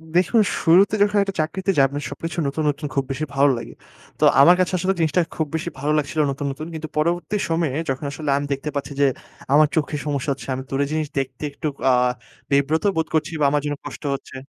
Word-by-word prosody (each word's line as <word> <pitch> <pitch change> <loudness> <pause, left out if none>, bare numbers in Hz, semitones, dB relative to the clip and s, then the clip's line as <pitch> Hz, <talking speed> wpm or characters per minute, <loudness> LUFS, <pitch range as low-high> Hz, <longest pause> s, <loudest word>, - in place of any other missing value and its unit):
দেখুন, 180 +5 +2 0.3
শুরুতে 185 +5 +5
যখন 205 0 +1
একটা 195 -1 -5
চাকরিতে 185 +5 -1
যান 135 -1 +4 0.2
সবকিছু 160 +3 -6
নতুন, 150 +3 -2
নতুন, 145 +1 -3
খুব 135 - +2
বেশি 145 +3 -2
ভালো 140 +1 +5
লাগে। 115 - -8 0.5
তো - - 0 0.2
আমার 175 +5 +8
কাছে 185 0 +1
আসলে 190 +2 +1
জিনিসটা 160 +1 +2
খুব 155 -2 -1
বেশি 165 +2 -2
ভালো 145 +3 0
লাগছিলো 150 +1 0
নতুন, 140 +1 -4
নতুন। 155 +4 -7
কিন্তু 160 0 -5
পরবর্তী 170 +4 0
সময়ে 165 -5 0
যখন 135 +2 -2
আসলে 145 +1 -5
আমি 145 - -2
দেখতে 140 +2 -4
পাচ্ছি 140 0 -3
যে - - +6 0.5
আমার 150 +1 +6
চোখে 155 -1 0
সমস্যা 145 -1 -2
হচ্ছে, - - -11
আমি 130 +1 -4
দূরের 140 +1 0
জিনিস 155 -1 -1
দেখতে 130 +1 -5
একটু 155 +2 -4 0.2
আ - - +6 0.6
বিব্রত 140 +3 +2
বোধ 160 0 0
করছি 160 0 0
বা - - +4
আমার 145 0 +1
জন্য 145 0 -1
কষ্ট - - -8
হচ্ছে। 135 - -11
150 Hz, 210 wpm, -22 LUFS, 140-165 Hz, 0.6 s, আমার